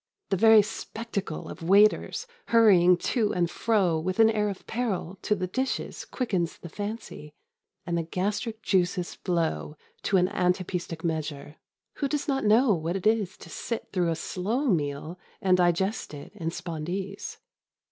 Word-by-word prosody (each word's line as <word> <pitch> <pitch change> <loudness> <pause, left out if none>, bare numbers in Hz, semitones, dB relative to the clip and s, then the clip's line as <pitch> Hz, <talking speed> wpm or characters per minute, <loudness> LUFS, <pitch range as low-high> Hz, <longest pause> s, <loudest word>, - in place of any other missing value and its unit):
The - - +4
very 220 +2 +7
spectacle 210 -4 -5
of - - -9
waiters 205 - +3 0.2
hurrying 185 -6 +6
to 215 +1 0
and 175 -1 +2
fro 190 -8 +2
with 185 +3 -2
an 225 0 +7
air 210 -1 +1
of 195 - -7
peril 200 -6 -3
to 210 - +1
the 185 -2 -2
dishes 260 +9 -3
quickens 190 -10 -2
the 170 - -10
fancy, 205 -6 -6 0.5
and 170 -1 -1
the 170 - +1
gastric 205 +6 -3
juices 180 -2 +1
flow 80 - -2 0.2
to 195 - +2
an 180 0 +4
anapæstic 180 -3 -1
measure. 155 -2 -3 0.4
Who 280 - 0
does 290 +1 -2
not 270 -2 0
know 220 +2 +5
what 165 0 -2
it 195 - -4
is 215 -4 +2
to - - -12
sit 230 - -5
through 180 -3 +1
a 165 - 0
slow 220 - -1
meal 155 0 -1 0.2
and 185 -1 +3
digest 180 +1 +1
in 165 +4 -6
spondees? 175 +4 -5
185 Hz, 155 wpm, -27 LUFS, 170-215 Hz, 0.5 s, very